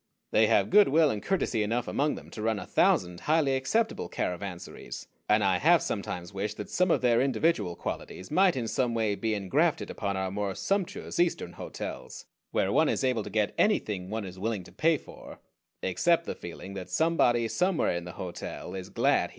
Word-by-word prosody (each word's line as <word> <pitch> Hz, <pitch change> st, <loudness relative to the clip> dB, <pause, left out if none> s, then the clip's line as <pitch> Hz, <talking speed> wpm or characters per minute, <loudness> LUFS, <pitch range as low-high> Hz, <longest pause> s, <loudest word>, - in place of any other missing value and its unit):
They -, -, +5 dB
have -, -, +3 dB
good 210 Hz, -1 st, +7 dB
will 155 Hz, +1 st, +4 dB
and 105 Hz, -, -3 dB
courtesy 175 Hz, -, 0 dB
enough 115 Hz, +3 st, -1 dB
among 145 Hz, +1 st, 0 dB
them -, -, -11 dB
to 110 Hz, -, -7 dB
run 110 Hz, 0 st, +1 dB
a -, -, -6 dB
thousand 90 Hz, -1 st, +2 dB
highly 150 Hz, -3 st, +2 dB
acceptable 220 Hz, +13 st, 0 dB
caravansaries, 90 Hz, -9 st, -5 dB, 0.2 s
and 105 Hz, 0 st, +4 dB
I 95 Hz, -2 st, +2 dB
have 170 Hz, +1 st, +5 dB
sometimes 90 Hz, -3 st, -4 dB
wished 105 Hz, +2 st, -3 dB
that -, -, -7 dB
some 180 Hz, 0 st, +2 dB
of -, -, +3 dB
their 120 Hz, -1 st, +4 dB
individual 125 Hz, -, +1 dB
qualities 95 Hz, -, -6 dB
might 185 Hz, +1 st, +4 dB
in 120 Hz, -3 st, -2 dB
some 120 Hz, 0 st, 0 dB
way 110 Hz, -2 st, +1 dB
be 110 Hz, +1 st, -1 dB
engrafted 100 Hz, -3 st, +1 dB
upon 100 Hz, -1 st, -3 dB
our 95 Hz, -1 st, -2 dB
more 100 Hz, -1 st, -2 dB
sumptuous 195 Hz, -3 st, -2 dB
Eastern 175 Hz, -1 st, +1 dB
hotels, -, -, -7 dB, 0.2 s
where -, -, 0 dB
one -, -, +3 dB
is -, -, 0 dB
able 125 Hz, -4 st, +1 dB
to 105 Hz, -, -7 dB
get 105 Hz, 0 st, 0 dB
anything 105 Hz, -, +1 dB
one 110 Hz, 0 st, -3 dB
is 95 Hz, 0 st, -9 dB
willing 105 Hz, -2 st, -2 dB
to -, -, -14 dB
pay 160 Hz, 0 st, +2 dB
for, -, -, -12 dB, 0.5 s
except 170 Hz, -, +2 dB
the -, -, -3 dB
feeling 85 Hz, +3 st, -9 dB
that 95 Hz, -2 st, -7 dB
somebody 120 Hz, -, +2 dB
somewhere 180 Hz, -, +1 dB
in 85 Hz, 0 st, -4 dB
the 90 Hz, -, -7 dB
hotel 90 Hz, -2 st, -6 dB
is 95 Hz, -1 st, -6 dB
glad -, -, +3 dB
he -, -, -1 dB
came. -, -, -19 dB
110 Hz, 200 wpm, -28 LUFS, 95-155 Hz, 0.5 s, good